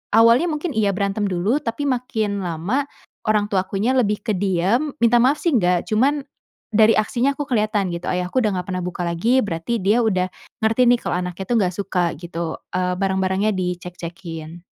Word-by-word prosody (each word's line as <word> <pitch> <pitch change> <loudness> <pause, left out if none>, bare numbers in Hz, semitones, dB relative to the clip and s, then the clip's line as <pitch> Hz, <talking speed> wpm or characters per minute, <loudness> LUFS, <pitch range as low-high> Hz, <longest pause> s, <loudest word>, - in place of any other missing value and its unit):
awalnya 230 +8 +6
mungkin 305 +2 -3
iya 210 -2 +2
berantem 200 +1 -1
dulu 195 +10 +1
tapi 230 +5 -3
makin 225 -6 -1
lama 180 - -1 0.5
orang 210 -1 +3
tuaku 195 -1 -1
nya 235 +6 +2
lebih 210 -5 +2
ke 225 - 0
diem, 195 - +1
minta 235 0 +4
maaf 275 +4 +3
sih 340 - +1
nggak, 180 -5 +2
cuman 275 +6 +2 0.5
dari 220 +1 +5
aksinya 245 +6 +1
aku 290 - -3
kelihatan 215 -7 0
gitu 170 0 -5
ayahku 180 +7 0
udah 215 -5 +1
nggak - - -4
pernah 185 - -2
buka 180 0 -4
lagi 200 +10 +2
berarti 170 +3 -2
dia 210 +5 +3
udah 185 -5 +1 0.3
ngerti 225 +3 +3
nih 240 0 +5
kalau 180 - -1
anaknya 180 +1 -4
tuh 240 - +1
nggak 185 -3 0
suka 190 -2 -1
gitu, 170 0 -5 0.2
eee, 180 0 0
barang-barangnya 190 +1 +1
dicek-cekin. 175 -2 -6
200 Hz, 180 wpm, -21 LUFS, 180-235 Hz, 0.5 s, awalnya